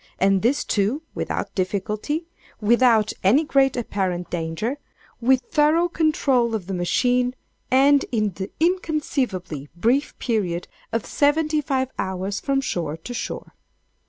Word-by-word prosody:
_ - - -30
and 195 0 +3
this 260 +6 +2
too 220 +10 0
without - - -3
difficulty—without 220 - 0
any 235 +12 +5
great 275 -4 +2
apparent 185 -6 -2
danger—with 230 - -2
thorough 310 +4 +3
control 275 -8 +1
of 205 -5 -4
the 195 - -4
machine—and 250 +7 +1
in 215 -4 +1
the 190 +3 -5
inconceivably 280 - -1
brief 240 +11 +1
period 185 -8 -1 0.2
of 230 -2 -1
seventy 305 +1 +2
five 265 -2 -1
hours 190 +1 -2
from 275 -1 0
shore 165 - -3
to 245 - -8
shore! - - -5
240 Hz, 120 wpm, -23 LUFS, 195-285 Hz, 0.2 s, any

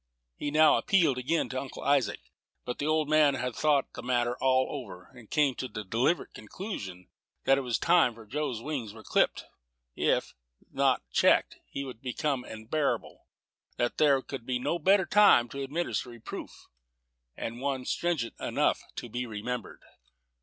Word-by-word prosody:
He 145 - -3
now 155 +1 +5
appealed 165 -10 +3
again 155 +6 0
to 130 - -2
Uncle 135 - -8
Isaac; 140 - +2 0.4
but 125 - -4
the 145 - -1
old 155 -1 +2
man 150 -2 +4
had 125 -1 -3
thought 150 -3 +2
the - - -7
matter 120 -1 0
all 130 0 +3
over, 105 -10 -8
and 120 -4 -15
come 150 -3 +2
to 130 - -2
the 105 - -6
deliberate 120 - 0
conclusion 100 - -7 0.4
that 135 0 +4
it - - -2
was 125 -3 -1
time 170 -9 +4
Joe's 135 -2 -3
wings 130 -9 -4
were 110 -1 -12
clipped; - - +2 0.5
that, - - -8
if - - +1 0.4
not - - +2
checked, - - +3
he 140 - -4
would 125 -4 -9
become 135 +1 -1
unbearable; 115 +7 -3 0.5
that 120 - -1
there 140 -3 +4
could 135 -4 -7
be 125 +1 -1
no 170 +7 -1
better 190 +3 +4
time 205 -14 +6
to 140 - -6
administer 140 -1 -2
reproof, 120 -2 -8 0.9
and 115 +2 -5
one 135 -2 -2
stringent 165 -8 -1
enough - - +1
to - - -5
be 120 +2 -4
remembered. 115 +3 -5
130 Hz, 165 wpm, -29 LUFS, 120-150 Hz, 0.9 s, time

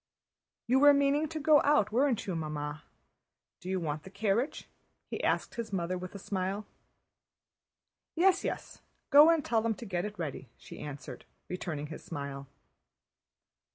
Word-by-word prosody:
"You 255 +3 +3
were 290 0 +8
meaning 280 +2 +2
to 315 +1 -5
go 300 -1 +5
out, 215 -8 +3
weren't 255 0 +2
you, 185 - -2
Mamma? 150 -1 -4 0.8
Do 180 - -8
you 190 0 0
want 155 -3 -3
the 190 - -11
carriage?" 220 +7 -1 0.4
he - - -4
asked - - 0
his 235 -2 -5
mother 180 -1 -1
with 185 +2 -7
a - - -4
smile. 195 +1 -3 1.5
"Yes, 375 +2 +4
yes, - - -5 0.3
go 295 +2 +9
and 330 -4 +3
tell 225 -2 +2
them 225 0 0
to 235 - -9
get 180 -2 -2
it 210 0 -6
ready," 145 -6 -5
she - - -11
answered, 145 -2 -8 0.2
returning 170 -5 -4
his - - -10
smile. 140 -3 -6
200 Hz, 155 wpm, -31 LUFS, 165-275 Hz, 1.5 s, go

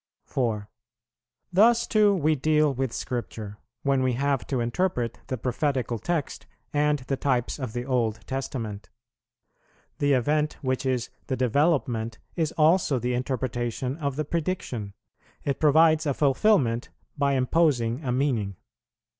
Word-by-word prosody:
4. 110 -5 -1 0.9
Thus 230 +5 +5
too 210 -2 +4
we 155 -3 +2
deal 150 0 +2
with 130 -1 -2
Scripture, 110 -5 -5 0.2
when 140 -1 +2
we 130 -1 +1
have 140 +1 0
to 130 - -1
interpret 120 -1 -1
the 130 - -2
prophetical 125 -1 -1
text 165 +5 -3 0.3
and 150 0 +2
the 135 +2 -2
types 130 -1 -1
of 130 -5 -4
the 120 0 -3
Old 115 -4 0
Testament. 115 -7 -4 1.1
The 145 -1 +3
event 150 +4 +1
which 130 0 -1
is 125 -2 -1 0.2
the 130 - -1
development 125 -4 +1 0.2
is 160 -2 0
also 155 -2 +3
the 125 +1 -1
interpretation 125 0 -2
of 140 -4 -2
the 155 +1 -2
prediction; 145 - -3 0.5
it 140 - -1
provides 155 +1 +5
a 140 - +1
fulfilment 135 - +2 0.3
by 140 -2 +1
imposing 130 -2 +1
a 125 - -1
meaning. 120 -7 0
135 Hz, 135 wpm, -26 LUFS, 120-150 Hz, 1.1 s, Thus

